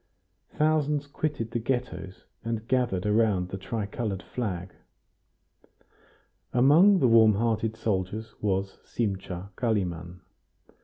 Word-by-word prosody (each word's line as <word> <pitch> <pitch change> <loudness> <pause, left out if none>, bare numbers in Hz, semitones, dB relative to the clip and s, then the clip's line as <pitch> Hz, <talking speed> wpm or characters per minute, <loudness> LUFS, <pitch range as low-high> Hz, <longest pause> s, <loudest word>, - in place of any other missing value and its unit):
Thousands 150 -1 +1
quitted 145 -5 -3
the 120 - -1
Ghettos, 110 -7 -3 0.2
and 115 0 -3
gathered 120 -8 +1
around 105 -4 +2
the 95 - -5
tricolored 105 0 -3
flag. 95 -7 -4 1.8
Among 155 +11 +6
the 130 - +3
warm 110 -2 +6
hearted 110 0 0
soldiers 110 +1 -2
was 95 -1 -1
Simcha 95 -3 -4
Kalimann. 90 -6 -2
110 Hz, 100 wpm, -27 LUFS, 95-125 Hz, 1.8 s, Among